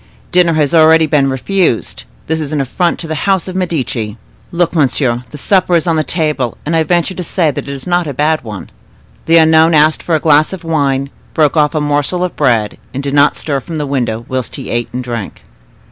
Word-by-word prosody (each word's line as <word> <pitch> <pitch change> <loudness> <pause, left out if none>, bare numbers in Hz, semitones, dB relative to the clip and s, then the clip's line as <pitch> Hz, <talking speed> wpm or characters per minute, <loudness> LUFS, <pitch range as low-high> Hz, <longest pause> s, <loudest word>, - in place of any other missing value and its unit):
Dinner 175 -2 +3
has 150 -1 +1
already 160 0 +5
been 145 -3 +2
refused; 135 - -1 0.2
this 160 0 -1
is 150 -2 -4
affronting 155 +4 -1
to 165 - -7
the 160 - -3 0.2
house 190 -3 +1
of 185 - -5
les - - 0
Medici. 125 - -3 0.3
Look, 170 -1 0
monsieur, 130 -5 +1
the 150 - -9
supper 185 +3 +2
is 165 - +1
on 165 -2 +1
the 155 - +1
table, 150 -7 -1
and 165 +2 -1
I 165 - +3
venture 175 +3 0
to 180 - -5
say 165 -2 +1
that 140 - -6
it - - -3
is 135 -2 -7
not 175 -2 0
a 145 - -4
bad 155 +3 +1
one." 105 -4 -8 0.6
The 165 +1 +5
unknown 160 0 +5
asked 155 +1 +3
for 165 - 0
a - - +1
glass 155 +2 +3
of 190 - -7
wine, 140 -4 -1 0.2
broke 150 -2 +2
off 150 0 +2
a - - +2
morsel 145 +5 0
of 180 - -3
bread, 115 -7 0 0.2
and 135 - -3
did 140 0 -3
not 145 0 +4
stir 140 -3 -2
from 160 +6 -8
the 150 -1 -2
window 120 -5 -2
whilst 130 -1 -3
he - - -7
ate 120 0 -2
and 125 +1 -4
drank. 115 -5 -6
155 Hz, 225 wpm, -14 LUFS, 135-165 Hz, 0.6 s, already